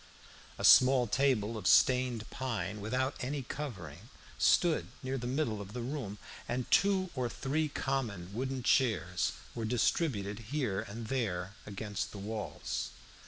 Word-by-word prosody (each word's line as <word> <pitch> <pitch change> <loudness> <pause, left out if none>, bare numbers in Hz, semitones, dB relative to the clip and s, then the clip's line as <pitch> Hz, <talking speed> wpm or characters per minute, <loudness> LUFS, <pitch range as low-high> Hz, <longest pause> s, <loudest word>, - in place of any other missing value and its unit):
A - - -6
small 130 -1 +7
table 115 -2 +1
of 95 - -2
stained 125 -4 +4
pine, 105 -6 -3
without 130 +6 0
any 135 +2 -3
covering, 110 - -7 0.3
stood 170 -3 +3 0.2
near 130 +1 -2
the 120 -2 -3
middle 125 -6 -1
of 100 +1 -9
the 120 -1 -4
room, 120 -6 -4 0.3
and 125 0 -1
two 190 -2 +3
or 125 -3 -1
three 150 +6 -1
common 110 -11 -2
wooden 130 +2 -3
chairs 110 -9 +2 0.2
were 115 - -4
distributed 110 - 0
here 125 -9 0
and 110 +2 -7
there 100 -7 -2
against 105 0 -4
the - - -7
walls. 105 +2 -4
120 Hz, 140 wpm, -32 LUFS, 105-135 Hz, 0.3 s, small